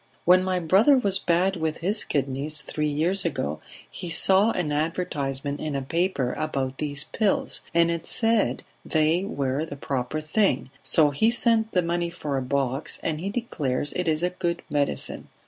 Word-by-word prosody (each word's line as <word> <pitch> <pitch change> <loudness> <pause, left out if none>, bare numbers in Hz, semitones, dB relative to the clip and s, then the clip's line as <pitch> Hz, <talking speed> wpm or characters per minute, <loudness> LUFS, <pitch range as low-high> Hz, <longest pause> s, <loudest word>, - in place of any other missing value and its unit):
When 185 +1 +6
my 185 -1 0
brother 195 - +4
was 200 -6 +1
bad 180 +3 +1
with 160 -1 -2
his 205 +5 +1
kidneys 140 +2 -2
three 150 +1 -2
years 170 +6 +1
ago 75 - -2 0.3
he 175 - -7
saw 190 +6 +6
an 175 -8 -1
advertisement 145 -3 -2
in 155 -2 -3
a 135 - -2
paper 165 -4 -1
about 135 -4 -2
these 145 -1 -2
pills, 200 +6 -1
and 170 0 +3
it 170 -1 -4
said 225 -1 +1 0.2
they 160 +3 +1
were 140 -6 -2
the 160 - -6
proper 135 +2 -3
thing, 155 - 0
so 150 -3 +4
he 220 +11 +2
sent 230 -2 +1
the 180 - +2
money 170 0 -1
for 150 -4 -4
a 135 - 0
box, 135 +1 -2
and 155 -1 -2
he 195 - -3
declares 150 - -2
it 180 -1 -2
is 155 +1 +1
a 180 - +1
good 175 -1 -3
medicine. 145 -1 -2
160 Hz, 175 wpm, -25 LUFS, 145-185 Hz, 0.3 s, When